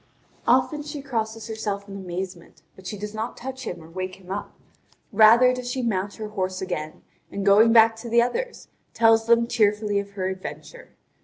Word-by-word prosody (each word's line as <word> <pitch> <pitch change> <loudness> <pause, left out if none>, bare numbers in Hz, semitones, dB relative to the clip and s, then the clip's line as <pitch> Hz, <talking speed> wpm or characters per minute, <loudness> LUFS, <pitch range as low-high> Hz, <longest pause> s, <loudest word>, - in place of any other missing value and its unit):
Often 300 -2 +3
she 295 0 -6
crosses 225 -5 -3
herself 210 -2 -4
in 195 - -8
amazement, 185 -2 -7
but 190 -1 -12
she 210 - -5
does 210 +1 -6
not 220 +2 -4
touch 260 0 -7
him 175 -2 -6
or - - -13
wake 185 +2 -5
him 185 -1 -13
up; 200 - -5 0.6
rather 230 +4 +6
does 250 -1 -5
she 255 0 -2
mount 200 -3 -1
her 215 -1 -6
horse 185 -3 -3
again, 155 -4 -5 0.3
and 200 -1 -4
going 210 +3 +6
back 225 -1 +6
to 235 +1 -8
the 235 +1 +4
others, 475 - -2 0.3
tells 225 -1 +4
them 235 0 +5
tearfully 210 -2 +1
of 200 0 -7
her 190 -2 -2
adventure. 190 - -8
215 Hz, 185 wpm, -24 LUFS, 190-235 Hz, 0.6 s, rather